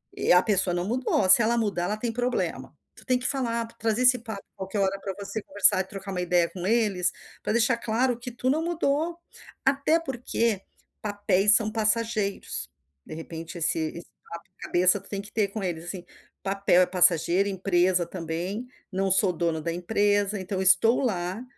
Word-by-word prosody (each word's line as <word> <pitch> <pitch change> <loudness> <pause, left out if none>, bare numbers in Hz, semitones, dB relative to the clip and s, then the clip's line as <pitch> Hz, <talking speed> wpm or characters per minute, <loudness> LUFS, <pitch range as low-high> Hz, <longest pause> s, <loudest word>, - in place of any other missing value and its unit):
E - - 0
a 180 +1 +6
pessoa 195 -4 +1
não 175 +1 -2
mudou, 245 -4 0
se 235 - +8
ela 235 +2 +2
mudar 205 -6 -1
ela 210 +3 -2
tem 230 +1 -2
problema". 245 +1 -3 0.2
Tu - - -16
tem 255 -1 +2
que 250 - -8
falar, 235 -4 -1
trazer 225 +2 0
esse 250 0 +6
papo 220 -4 -8
qualquer 190 +2 -5
hora 195 0 0
pra 195 -2 -5
você 205 +2 -5
conversar 200 0 +3
e - - +1
trocar 195 0 -8
uma 180 -1 -2
ideia 175 -1 +2
com 180 -1 -6
eles, 205 -6 +2 0.3
pra - - -2
deixar 235 +2 +3
claro 235 +2 0
que 245 +1 -6
tu 250 +2 -1
não 315 +3 0
mudou. 330 0 -1 0.5
Até 280 +4 +2
porque 235 - -2 0.4
papéis 205 0 +3
são 215 -2 +1
passageiros. 215 - -1 0.3
De - - -9
repente 165 +2 -8
esse 165 0 +1
esse 160 +2 -5 0.2
papo 170 0 -9
cabeça 180 +3 +2
tu 195 - -17
tem 200 -1 -4
que 205 - -13
ter 215 -3 +1
com 200 0 -6
eles, 170 -2 -4
assim: 180 0 -6 0.4
"Papel 195 -2 +3
é - - +2
passageiro, 180 +1 +3
empresa 185 -2 +1
também. 175 +6 -5 0.2
Não 195 +1 -1
sou 190 0 +3
dono 165 -1 -1
da 165 +2 -3
empresa, 205 +2 0
então 190 0 -3
estou 205 +7 +4
lá, 190 -2 -2
200 Hz, 185 wpm, -26 LUFS, 180-230 Hz, 0.5 s, se